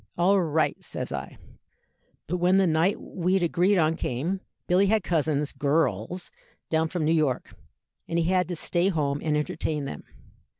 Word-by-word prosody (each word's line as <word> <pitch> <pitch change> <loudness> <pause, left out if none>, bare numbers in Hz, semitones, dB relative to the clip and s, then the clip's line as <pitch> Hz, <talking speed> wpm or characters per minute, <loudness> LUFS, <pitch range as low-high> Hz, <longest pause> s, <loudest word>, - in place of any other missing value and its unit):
'All 190 +3 +4
right,' 160 -2 0
says - - -5
I. 70 0 -5 0.9
"But 180 - -2
when 180 +2 +3
the 195 - +4
night 165 +4 +2
we'd 185 +1 -1
agreed 180 +4 +2
on 160 -1 +3
came, 165 +7 -2 0.2
Billy 185 +3 +3
had 215 -1 +2
cousins 150 -4 0
girls 145 - -1 0.4
down 160 0 +2
from 165 -2 -2
New 155 - +2
York, 150 -6 0 0.5
and 165 - -2
he 170 - +2
had 180 0 +2
to 175 - -3
stay 175 +3 +1
home 145 -5 -1
and 150 -2 +1
entertain 150 -1 -2
them. 75 - -6
165 Hz, 165 wpm, -26 LUFS, 150-180 Hz, 0.9 s, All